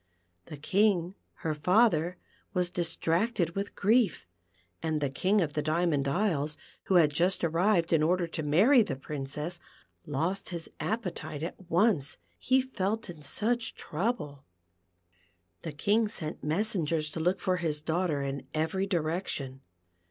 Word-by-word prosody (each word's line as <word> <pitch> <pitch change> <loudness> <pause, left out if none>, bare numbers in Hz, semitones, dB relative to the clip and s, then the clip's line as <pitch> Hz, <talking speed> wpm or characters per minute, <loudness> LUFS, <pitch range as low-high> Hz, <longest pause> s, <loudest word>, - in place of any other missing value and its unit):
The 150 - -8
King, 185 +2 +2 0.3
her 160 - +1
father, 180 +1 +3 0.4
was 180 -1 +1
distracted 175 +2 0
with 200 +3 -4
grief, 220 -1 +2 0.6
and 160 -2 0
the 140 -2 -1
King 195 +8 +2
of 155 -4 -1
the 150 - 0
Diamond 155 -2 +1
Isles, 155 -3 0 0.3
who 190 - +1
had 155 -4 +5
just 180 +5 +1
arrived 170 +1 +2
in 160 - +4
order 175 +3 +2
to 165 -1 -5
marr\ 195 - +5
the 180 -11 -1
Princess, 150 +5 -4 0.5
lost 165 +8 -1
his 170 -3 -6
appetite 180 -8 -3
at 175 +2 -7
once, 175 -5 +2 0.2
he 260 0 +3
felt 220 -4 -2
in 160 -3 -13
such 225 +10 0
trouble. 150 - -3 1.2
The 160 - -5
King 205 +9 +2
sent 160 -7 -6
messengers 160 -3 0
to 165 - -5
look 180 +4 +1
for 185 -2 0
his 160 -4 -1
daughter 160 -2 -1
in 140 -1 -4
every 160 +5 0
direction. 155 -6 -2
170 Hz, 140 wpm, -29 LUFS, 150-195 Hz, 1.2 s, had